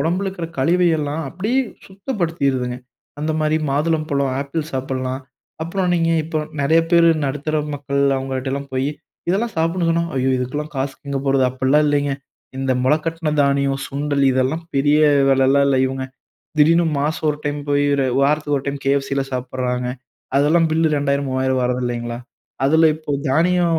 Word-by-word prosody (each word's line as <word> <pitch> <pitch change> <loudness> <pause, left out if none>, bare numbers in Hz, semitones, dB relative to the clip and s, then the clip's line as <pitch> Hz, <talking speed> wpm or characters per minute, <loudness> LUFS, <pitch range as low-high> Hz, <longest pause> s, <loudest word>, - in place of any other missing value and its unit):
உடம்புல 180 +4 0
இருக்கிற 175 -3 -5
கழிவையெல்லாம் 160 -1 +1
அப்டியே 210 - 0 0.3
சுத்தப்படுத்திருதுங்க. 165 - -2 0.4
அந்தமாரி 155 0 0
மாதுளம்பழம், 145 -2 0
ஆப்பிள் 145 +3 -3
சாப்பிட்லாம். 130 0 -3 0.4
அப்புறம் 180 +2 -1
நீங்க 165 -1 +2
இப்போ 160 -1 -2 0.2
நிறைய 160 +4 +4
பேரு 170 -1 +6 0.2
நடுத்தர 145 +3 -2 0.2
மக்கள் 140 0 -2 0.2
அவுங்கள்ட்டயெல்லாம் 135 +1 -3
போயி, 130 +1 0 0.4
இதல்லாம் 210 +5 0
சாப்பிடன்னு 165 +1 +1
சொன்னா, 170 0 +1
ஐயோ! 130 0 +1
இதுக்குல்லாம் 145 +5 -4
காசுக்கு 135 +1 -4
எங்க 140 - -1
போறது? 135 -1 +3
அப்பி்ட்லாம் 130 +4 +2
இல்லேங்க. 145 -1 +1 0.5
இந்த 135 -1 0
முளக்கட்ன 160 +3 0
தானியம், 140 -1 +1
சுண்டல் 140 0 -1
இதெல்லாம் 130 +6 0
பெரிய 145 +2 +3 0.3
விலலாம் 135 +1 +4
இல்ல. 135 - +2
இவுங்க 130 0 -3 0.5
திடீர்ன்னு 165 +3 +5
மாசம் 155 +2 -1
ஒரு 150 - -4
டைம் 145 0 -2
போயி 145 0 +2 0.2
அ - - +1
வாரத்துக்கு 145 +1 +2
ஒரு - - -9
டைம் 140 0 -2
கேஎப்ஃசில 140 0 +1
சாப்பிட்றாங்க. 125 -1 -2 0.5
அதெல்லாம் 160 +4 +3
பில்லு 160 0 +2
இரண்டாயிரம், 140 -1 0
மூவாயிரம் 130 0 0
வர்றது 125 0 0
இல்லேங்களா! 120 -1 -3 0.5
அதுல 160 +3 +5
இப்போ 155 -2 -8 0.2
தானியம் 170 +2 +2
145 Hz, 145 wpm, -20 LUFS, 135-165 Hz, 0.5 s, பேரு